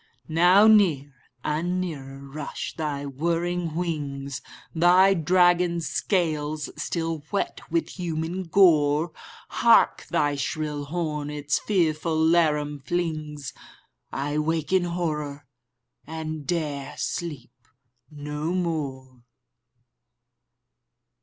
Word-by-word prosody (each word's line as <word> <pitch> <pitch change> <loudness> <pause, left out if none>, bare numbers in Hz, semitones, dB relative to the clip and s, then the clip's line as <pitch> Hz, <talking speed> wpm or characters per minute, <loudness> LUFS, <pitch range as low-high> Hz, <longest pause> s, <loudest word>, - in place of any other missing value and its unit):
Now 180 +6 +6
near 170 -11 +4 0.3
and 175 +4 -1
nearer 140 -6 -6
rush 145 +2 -6
thy 145 -3 -3
whirring 170 +3 -1
wings, 140 -6 -3 0.3
Thy 180 +3 +5
dragon 175 0 +3
scales 155 -4 -1
still 165 -2 -2
wet 200 - -2
with 170 +3 -2
human 170 +2 -3
gore. 160 -3 +4 0.4
Hark, - - +4
thy 145 -1 +1
shrill 150 0 -3
horn 150 -2 -3
its 145 -1 -1
fearful 165 -4 0
laram 155 -3 +2
flings! 155 -4 -3 0.6
—I 145 +2 -2
wake 160 +1 -1
in 185 -2 +4
horror, 150 -5 -3 0.6
and 155 -2 -5
'dare 145 -5 -2
sleep 150 -8 -4 0.6
no 150 +2 -4
more! 135 -8 -3
155 Hz, 95 wpm, -25 LUFS, 145-175 Hz, 0.6 s, Now